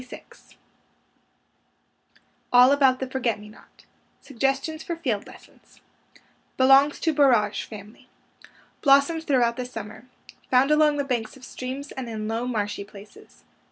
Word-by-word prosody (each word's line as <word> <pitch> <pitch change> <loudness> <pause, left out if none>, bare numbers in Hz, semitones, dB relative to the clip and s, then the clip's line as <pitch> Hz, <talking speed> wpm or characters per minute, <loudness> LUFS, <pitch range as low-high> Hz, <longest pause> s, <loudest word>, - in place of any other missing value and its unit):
92 255 - -15 2.0
ALL 250 +2 +7
ABOUT 270 -2 +3
THE 265 - -4
FORGET 255 -4 -2
ME 210 0 -12
NOT 215 - -20 0.4
SUGGESTIONS 275 +4 -2
FOR 340 - -5
FIELD 245 -11 -3
LESSONS - - -18 0.8
Belongs 270 +2 +5
to 320 - +1
borage 235 -8 +2
family. 210 0 -13 0.7
Blossoms 285 +3 +3
throughout 245 -5 +1
the 250 - -4
summer. 220 -1 -9 0.4
Found 260 +3 +3
along 300 -1 +3
the 285 - 0
banks 250 -2 -3
of 255 - -13
streams 265 +3 -7
and 255 -3 -6
in 215 -1 -5
low, 225 +2 -3
marshy 205 -4 -3
places. 200 0 -16
255 Hz, 130 wpm, -24 LUFS, 225-280 Hz, 2.0 s, ALL